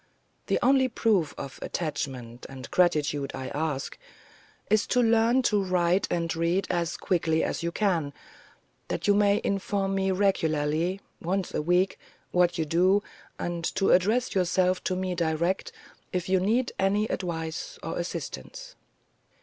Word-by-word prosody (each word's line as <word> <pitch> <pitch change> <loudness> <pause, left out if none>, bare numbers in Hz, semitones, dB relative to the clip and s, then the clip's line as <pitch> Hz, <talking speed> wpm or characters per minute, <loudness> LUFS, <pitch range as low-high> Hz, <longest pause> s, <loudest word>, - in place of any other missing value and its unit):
The - - +2
only 265 0 +4
proof 210 - +1
of 140 -1 -7
attachment 130 -7 -4
and 130 -1 -9
gratitude 150 -5 +2
I 130 -1 -5
ask, 145 -3 -3 0.7
is 215 0 +2
to 250 - +2
learn 230 +2 +4
to 210 -4 +2
write 180 0 +2
and 170 -1 -1
read 170 +4 +1
as 170 -1 -1
quickly 160 -3 +1
as - - -2
you 170 0 -1
can, 170 -7 0 0.8
that - - -3
you 205 - +6
may 205 0 +3
inform 195 0 -1
me 195 0 +1
regularly, 170 -2 +1 0.2
once 185 +2 -2
a - - 0
week, 180 +4 +1 0.3
what 175 0 +3
you 160 - 0
do, 185 +6 +3 0.3
and 175 -1 -3
to 195 - +2
address 220 +8 +3
yourself 185 0 +1
to 185 - 0
me 185 0 -2
direct 170 +2 0 0.4
if 180 -1 -2
you 190 0 +3
need 230 +7 +1
any 200 +2 +2
advice 170 - -4
or - - -3
assistance." - - -6
180 Hz, 145 wpm, -27 LUFS, 165-200 Hz, 0.8 s, you